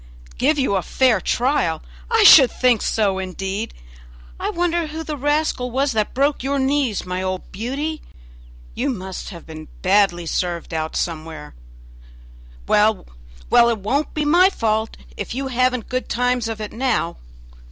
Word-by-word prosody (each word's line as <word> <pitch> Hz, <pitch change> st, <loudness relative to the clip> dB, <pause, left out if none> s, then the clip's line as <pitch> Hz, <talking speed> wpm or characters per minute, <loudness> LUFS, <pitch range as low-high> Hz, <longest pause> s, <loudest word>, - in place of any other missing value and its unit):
"Give 300 Hz, +4 st, +2 dB
you 265 Hz, -8 st, +1 dB
a -, -, 0 dB
fair 255 Hz, +4 st, +2 dB
trial! 235 Hz, -, 0 dB, 0.3 s
I 450 Hz, -2 st, +4 dB
should 275 Hz, -10 st, +9 dB
think 245 Hz, -4 st, +2 dB
so 200 Hz, -4 st, 0 dB
indeed! 195 Hz, +3 st, -4 dB, 0.7 s
I -, -, -2 dB
wonder 345 Hz, -1 st, 0 dB
who 315 Hz, +1 st, -6 dB
the 305 Hz, -1 st, -4 dB
rascal 290 Hz, -2 st, 0 dB
was 270 Hz, +3 st, 0 dB
that 215 Hz, -3 st, -1 dB
broke 280 Hz, +2 st, +1 dB
your 275 Hz, +2 st, -1 dB
knees, 265 Hz, -5 st, 0 dB
my 180 Hz, 0 st, -3 dB
old 185 Hz, 0 st, -4 dB
Beauty! 275 Hz, +10 st, -4 dB, 0.7 s
you 275 Hz, +4 st, -1 dB
must 190 Hz, -6 st, -5 dB
have 170 Hz, -4 st, -11 dB
been 155 Hz, -1 st, -10 dB, 0.2 s
badly 185 Hz, -3 st, +3 dB
served 170 Hz, 0 st, -3 dB
out 160 Hz, 0 st, -3 dB
somewhere; 160 Hz, -2 st, -4 dB, 1.1 s
well, 210 Hz, -1 st, +3 dB, 0.5 s
well, 235 Hz, -, +6 dB
it 230 Hz, -, 0 dB
won't 260 Hz, +10 st, -2 dB
be 305 Hz, -1 st, 0 dB
my 350 Hz, +5 st, +5 dB
fault 220 Hz, -, -1 dB, 0.2 s
if -, -, -5 dB
you 270 Hz, 0 st, -3 dB
haven't 255 Hz, -1 st, 0 dB
good 255 Hz, 0 st, -3 dB
times 245 Hz, -1 st, 0 dB
of 225 Hz, -1 st, -5 dB
it 210 Hz, -1 st, -6 dB
now. 230 Hz, -8 st, -1 dB
235 Hz, 155 wpm, -21 LUFS, 190-280 Hz, 1.1 s, should